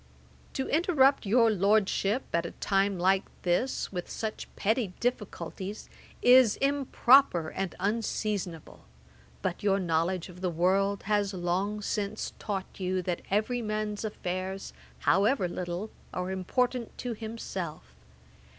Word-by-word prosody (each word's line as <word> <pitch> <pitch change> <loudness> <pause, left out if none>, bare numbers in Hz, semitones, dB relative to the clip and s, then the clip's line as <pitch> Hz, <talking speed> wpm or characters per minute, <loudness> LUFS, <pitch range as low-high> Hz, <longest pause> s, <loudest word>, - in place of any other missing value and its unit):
'To 265 - -2
interrupt 285 - +3
your 230 +2 +5
Lordship, 205 +3 +2
at 170 0 +2
a 170 - -4
time 195 -1 +1
like 190 +2 +3 0.2
this, 180 +9 0
with 180 -2 -5
such 220 -1 -4
petty 220 -2 0
difficulties, 205 -4 -4 0.3
is 250 -3 +7
improper 270 - +4
and 195 -2 -4
unseasonable; 205 -4 -2 0.6
but 180 -2 -2
your 195 -1 +3
knowledge 170 0 0
of 180 -1 -12
the 185 - 0
world 190 +4 +1
has 205 -1 0
long 190 +4 -1
since 205 +1 -2
taught 195 -2 -4
you, 185 0 -1
that 175 -1 -2
every 220 +5 +1
man's 215 -1 -2
affairs, 190 -2 -4 0.3
however 200 - +3
little, 175 +4 -4 0.2
are 180 +1 -2
important 240 +6 -1
to 245 -2 -3
himself. 195 - -6
200 Hz, 125 wpm, -29 LUFS, 185-225 Hz, 0.6 s, is